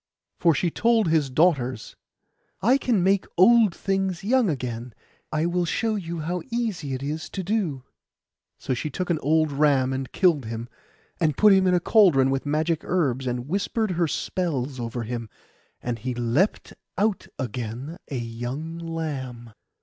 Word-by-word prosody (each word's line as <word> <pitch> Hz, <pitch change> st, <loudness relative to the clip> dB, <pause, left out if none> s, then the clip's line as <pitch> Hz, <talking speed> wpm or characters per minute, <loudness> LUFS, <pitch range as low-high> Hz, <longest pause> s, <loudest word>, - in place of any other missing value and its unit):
For 165 Hz, -3 st, +4 dB
she 175 Hz, +2 st, 0 dB
told 230 Hz, -1 st, +2 dB
his 155 Hz, -4 st, +2 dB
daughters, 130 Hz, -5 st, +1 dB, 0.7 s
'I 255 Hz, +6 st, +4 dB
can 225 Hz, -10 st, +1 dB
make 195 Hz, +1 st, +2 dB
old 215 Hz, 0 st, +6 dB
things 195 Hz, -2 st, -1 dB
young 240 Hz, 0 st, +3 dB
again; 125 Hz, -5 st, -4 dB, 0.4 s
I 155 Hz, +1 st, 0 dB
will 175 Hz, +1 st, +1 dB
show 220 Hz, +6 st, 0 dB
you 170 Hz, -5 st, -4 dB
how 175 Hz, +3 st, -2 dB
easy 215 Hz, -, -2 dB
it 130 Hz, -, -6 dB
is 155 Hz, +3 st, -4 dB
to 190 Hz, -, -4 dB
do.' 180 Hz, -, -1 dB, 0.7 s
So -, -, -2 dB
she 140 Hz, +5 st, -3 dB
took 180 Hz, +5 st, -3 dB
an 160 Hz, -, +1 dB
old 155 Hz, +1 st, +2 dB
ram 140 Hz, -2 st, +2 dB
and 130 Hz, -1 st, -4 dB
killed 165 Hz, -, +2 dB
him, 115 Hz, +1 st, -5 dB, 0.5 s
and 155 Hz, -5 st, +1 dB
put 210 Hz, -1 st, +7 dB
him 190 Hz, -1 st, +4 dB
in 180 Hz, -, +4 dB
a -, -, +3 dB
cauldron 170 Hz, -, +4 dB
with 135 Hz, +1 st, -2 dB
magic 155 Hz, +2 st, 0 dB
herbs; 135 Hz, -8 st, 0 dB
and 125 Hz, +1 st, -3 dB
whispered 200 Hz, +4 st, -1 dB
her 170 Hz, -1 st, +1 dB
spells 145 Hz, -6 st, -2 dB
over 120 Hz, 0 st, -3 dB
him, 115 Hz, 0 st, -5 dB, 0.5 s
and 120 Hz, -1 st, -3 dB
he 125 Hz, 0 st, -3 dB
leapt 120 Hz, -, 0 dB, 0.2 s
out 205 Hz, +1 st, 0 dB
again 125 Hz, +4 st, -5 dB
a 140 Hz, -, -3 dB
young 120 Hz, +8 st, -5 dB
lamb. 135 Hz, -8 st, -5 dB
155 Hz, 165 wpm, -25 LUFS, 130-185 Hz, 0.7 s, put